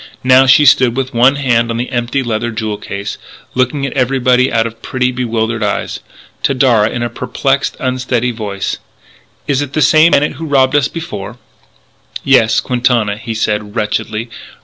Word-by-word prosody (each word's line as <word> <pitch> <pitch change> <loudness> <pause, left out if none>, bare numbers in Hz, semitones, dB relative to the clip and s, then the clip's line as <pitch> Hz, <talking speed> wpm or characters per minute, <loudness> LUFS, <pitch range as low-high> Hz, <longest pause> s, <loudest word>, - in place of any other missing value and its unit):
Now 130 +1 +5
she 140 +3 +6
stood 130 -3 +4
with 130 -1 -2
one 125 +4 +4
hand 120 -4 +1
on 115 - -2
the 120 +2 -4
empty 120 +2 -1
leather 120 0 -2
jewel 110 -2 -4
case, 100 0 -6 0.3
looking 130 +2 0
at 135 - -4
everybody 130 -1 +2
out 115 -1 +1
of 115 0 -7
pretty, 125 -1 -1
bewildered 115 -2 -2
eyes. 105 -1 -2 0.4
To 140 - 0
Darragh, 120 -5 +3
in 120 - -3
a - - 0
perplexed, - - -1
unsteady 125 -2 -1
voice: 105 -4 -4 0.7
"Is 140 -1 +1
it 140 -1 -5
the 155 - 0
same 160 +2 +5
bandit 145 -1 +1
who 160 +1 -6
robbed 135 -1 +2
us 145 -1 +3
before?" 160 - -7 0.9
"Yes; 125 -5 +4
Quintana," 120 -4 0
he 115 +1 -6
said 105 -1 -2
wretchedly. 110 +1 -3
125 Hz, 170 wpm, -14 LUFS, 115-130 Hz, 0.9 s, she